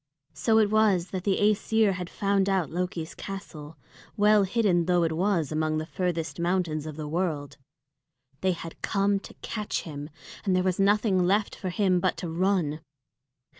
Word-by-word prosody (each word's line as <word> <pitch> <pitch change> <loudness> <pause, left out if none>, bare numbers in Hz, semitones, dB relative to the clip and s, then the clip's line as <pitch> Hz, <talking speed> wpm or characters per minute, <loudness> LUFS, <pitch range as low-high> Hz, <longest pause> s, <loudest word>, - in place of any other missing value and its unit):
So 225 -1 +2
it 210 -2 +4
was 205 -5 +3
that 185 -1 -4
the 195 -2 +2
Æsir 215 0 +3
had 180 -1 -5
found 200 -1 +1
out 190 -5 0
Loki's 175 -2 -3
castle, 160 -6 -8 0.4
well 210 -1 +5
hidden 190 -5 +2
though 175 -1 +3
it 165 - +1
was 170 -2 0
among 155 0 0
the 155 - -2
furthest 170 -1 -3
mountains 170 -3 0
of 155 - -6
the 155 -1 -5
world. 155 -3 -2 0.8
They 185 -1 +1
had 165 -1 -9
come 200 0 +1
to - - -13
catch 210 -2 -3
him, 145 -2 -7 0.3
and 190 -3 +1
there 185 - +2
was 185 0 0
nothing 195 -2 +3
left 205 +2 +1
for 185 - -4
him 185 -1 +2
but 185 +1 0
to 175 - -4
run. 170 -3 0
185 Hz, 170 wpm, -27 LUFS, 165-200 Hz, 0.8 s, well